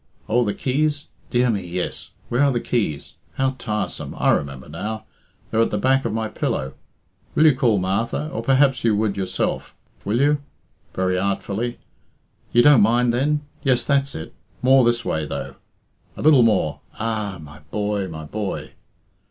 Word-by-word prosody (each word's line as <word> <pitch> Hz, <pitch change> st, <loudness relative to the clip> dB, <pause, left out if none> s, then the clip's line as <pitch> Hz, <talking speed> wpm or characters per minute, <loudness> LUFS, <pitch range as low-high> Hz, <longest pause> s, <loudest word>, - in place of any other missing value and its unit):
Oh, 120 Hz, +2 st, +3 dB
the 105 Hz, -3 st, -1 dB
keys? 145 Hz, +3 st, -1 dB, 0.2 s
Dear 125 Hz, 0 st, +3 dB
me, 100 Hz, -3 st, -1 dB
yes; 90 Hz, +1 st, -4 dB, 0.2 s
where 120 Hz, +3 st, 0 dB
are 140 Hz, -1 st, +4 dB
the 120 Hz, -, 0 dB
keys? 100 Hz, -, -2 dB, 0.2 s
How 135 Hz, 0 st, +1 dB
tiresome! 105 Hz, -2 st, -3 dB
I -, -, +3 dB
remember 70 Hz, -2 st, -2 dB
now. 105 Hz, +8 st, -5 dB, 0.5 s
They're 115 Hz, -, +2 dB
at 115 Hz, -, +3 dB
the 105 Hz, -, -1 dB
back 135 Hz, +4 st, +2 dB
of 115 Hz, -, 0 dB
my 110 Hz, 0 st, -1 dB
pillow. 65 Hz, -9 st, -2 dB, 0.6 s
Will 155 Hz, -, +5 dB
you 155 Hz, -, +7 dB
call 120 Hz, -5 st, +2 dB
Martha? 100 Hz, +10 st, -1 dB
Or 115 Hz, -, -4 dB
perhaps 135 Hz, +1 st, +3 dB
you 115 Hz, -2 st, +3 dB
would 105 Hz, -1 st, 0 dB
yourself 95 Hz, -2 st, -2 dB, 0.3 s
will 110 Hz, +4 st, 0 dB
you?" 145 Hz, +1 st, +3 dB, 0.5 s
(very 90 Hz, 0 st, +1 dB
artfully) 100 Hz, +4 st, -2 dB, 0.7 s
"you 120 Hz, -, +5 dB
don't 145 Hz, -5 st, +7 dB
mind 120 Hz, +3 st, +3 dB
then? 145 Hz, +4 st, +1 dB, 0.2 s
Yes, 130 Hz, -3 st, +2 dB
that's 140 Hz, -1 st, +1 dB
it; 80 Hz, -, -7 dB, 0.3 s
more 130 Hz, 0 st, +6 dB
this 120 Hz, 0 st, +1 dB
way, 80 Hz, -1 st, -1 dB
though, -, -, -5 dB, 0.6 s
a -, -, -5 dB
little 150 Hz, -4 st, +7 dB
more 105 Hz, -10 st, +2 dB, 0.2 s
ah! 110 Hz, -4 st, -2 dB
My 75 Hz, -1 st, -12 dB
boy! 105 Hz, -2 st, -1 dB
my 80 Hz, -2 st, -7 dB
boy!" 105 Hz, +5 st, -4 dB
115 Hz, 170 wpm, -22 LUFS, 100-130 Hz, 0.7 s, you